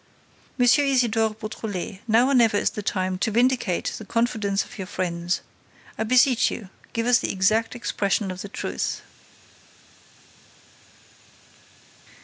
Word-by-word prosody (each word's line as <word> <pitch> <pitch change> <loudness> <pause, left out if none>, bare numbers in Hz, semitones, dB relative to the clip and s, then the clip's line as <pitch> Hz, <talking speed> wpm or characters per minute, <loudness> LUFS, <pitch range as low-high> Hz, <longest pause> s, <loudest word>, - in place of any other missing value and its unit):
M. 245 - +4
Isidore 240 -5 +3
Beautrelet, 210 -3 -5
now 230 +2 +4
or 275 - +1
never 230 -5 +4
is - - +1
the 210 - -5
time 185 -2 -2
to 225 - +1
vindicate 240 -4 +1
the - - -8
confidence 215 -3 0
of - - -13
your 190 - -5
friends. 175 -2 -2 0.5
I - - -2
beseech 250 +1 +4
you, 195 -4 -7 0.2
give 230 0 -2
us 245 -1 +5
the - - -2
exact 215 +5 +1
expression 200 -4 -1
of 185 0 -7
the 200 - -7
truth." - - -3
220 Hz, 130 wpm, -24 LUFS, 195-240 Hz, 0.5 s, us